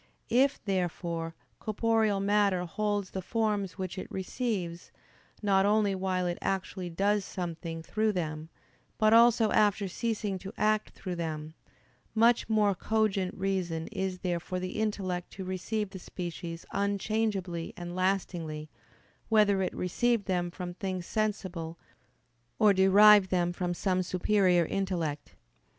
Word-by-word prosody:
If, 265 Hz, +4 st, +3 dB
therefore, 170 Hz, -3 st, -2 dB, 0.2 s
corporeal 220 Hz, -1 st, +1 dB
matter 200 Hz, -2 st, +2 dB
holds 205 Hz, +1 st, -2 dB
the 190 Hz, -, -3 dB
forms 210 Hz, -2 st, -1 dB
which 185 Hz, 0 st, -4 dB
it -, -, -8 dB
receives, 190 Hz, -4 st, -3 dB, 0.5 s
not 195 Hz, -2 st, +4 dB
only 205 Hz, 0 st, +3 dB
while 185 Hz, -1 st, -1 dB
it 175 Hz, -1 st, -2 dB
actually 190 Hz, -1 st, -2 dB
does 200 Hz, +4 st, +1 dB
something 165 Hz, -3 st, -5 dB
through 215 Hz, +5 st, 0 dB
them, 155 Hz, -3 st, -3 dB, 0.5 s
but 215 Hz, 0 st, +4 dB
also 230 Hz, -1 st, +6 dB
after 205 Hz, -1 st, +3 dB
ceasing 210 Hz, -1 st, -2 dB
to 195 Hz, +1 st, -7 dB
act 215 Hz, 0 st, +2 dB
through 180 Hz, -3 st, -5 dB
them, 155 Hz, -2 st, -4 dB, 0.6 s
much 230 Hz, +1 st, +4 dB
more 210 Hz, -2 st, +3 dB
cogent 195 Hz, -1 st, 0 dB
reason 185 Hz, -4 st, -1 dB
is 190 Hz, -3 st, -3 dB
there 175 Hz, -2 st, 0 dB
for 185 Hz, +2 st, -4 dB
the 185 Hz, +3 st, -4 dB
intellect 185 Hz, -5 st, -2 dB
to 195 Hz, -, -6 dB
receive 190 Hz, +3 st, -2 dB
the 190 Hz, -, -8 dB
species 170 Hz, -2 st, -6 dB
unchangeably 200 Hz, -3 st, -1 dB
and 175 Hz, 0 st, -6 dB
lastingly, 175 Hz, -5 st, -2 dB, 0.6 s
whether 210 Hz, -3 st, +4 dB
it 185 Hz, -, 0 dB
receive 225 Hz, +4 st, +1 dB
them 175 Hz, -2 st, 0 dB
from 175 Hz, 0 st, -6 dB
things 185 Hz, -1 st, -4 dB
sensible, 185 Hz, -7 st, -2 dB, 0.8 s
or 210 Hz, +4 st, +5 dB
derive 195 Hz, +1 st, +7 dB
them 175 Hz, -1 st, +1 dB
from 175 Hz, 0 st, -2 dB
some 185 Hz, 0 st, +1 dB
superior 185 Hz, -1 st, +2 dB
intellect. 170 Hz, -6 st, -3 dB
190 Hz, 135 wpm, -29 LUFS, 175-210 Hz, 0.8 s, derive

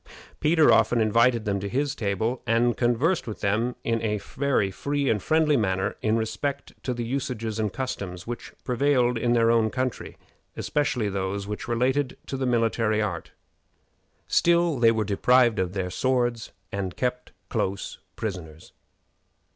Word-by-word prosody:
Peter 155 Hz, 0 st, +4 dB
often 120 Hz, -, +3 dB
invited 115 Hz, +1 st, +3 dB
them 100 Hz, -1 st, 0 dB
to 100 Hz, +1 st, -4 dB
his 140 Hz, +4 st, 0 dB
table, 110 Hz, +3 st, -2 dB
and 120 Hz, +1 st, +2 dB
conversed 125 Hz, +8 st, +1 dB
with 110 Hz, -, -6 dB
them 110 Hz, +5 st, 0 dB
in 115 Hz, -1 st, 0 dB
a 105 Hz, -1 st, 0 dB
very 125 Hz, -1 st, -1 dB
free 140 Hz, +7 st, -2 dB
and 105 Hz, -3 st, 0 dB
friendly 155 Hz, +4 st, +3 dB
manner 95 Hz, -5 st, 0 dB
in 110 Hz, +1 st, +2 dB
respect 115 Hz, +6 st, -3 dB
to 130 Hz, -, -3 dB
the 120 Hz, -1 st, -3 dB
usages 115 Hz, -3 st, -3 dB
and 105 Hz, -2 st, 0 dB
customs 95 Hz, -9 st, -5 dB
which 120 Hz, 0 st, -6 dB
prevailed 125 Hz, -1 st, +2 dB
in 120 Hz, +1 st, +1 dB
their 115 Hz, -1 st, +4 dB
own 115 Hz, -1 st, +3 dB
country, 130 Hz, +1 st, -3 dB, 0.4 s
especially 130 Hz, -7 st, 0 dB
those 100 Hz, 0 st, -2 dB
which 105 Hz, +1 st, -5 dB
related 125 Hz, +3 st, 0 dB
to -, -, -5 dB
the 130 Hz, -1 st, -1 dB
military 115 Hz, -2 st, +1 dB
art. 95 Hz, -6 st, -3 dB, 1.0 s
Still, 170 Hz, -4 st, +3 dB
they 115 Hz, -1 st, +6 dB
were 110 Hz, -1 st, +1 dB
deprived 120 Hz, +3 st, +3 dB
of 90 Hz, -1 st, -1 dB
their 95 Hz, -2 st, -3 dB
swords 120 Hz, 0 st, 0 dB, 0.2 s
and 95 Hz, -2 st, -4 dB
kept 125 Hz, 0 st, -2 dB, 0.2 s
close 95 Hz, +1 st, -2 dB, 0.2 s
prisoners. 85 Hz, -7 st, -6 dB
115 Hz, 155 wpm, -25 LUFS, 105-130 Hz, 1.0 s, they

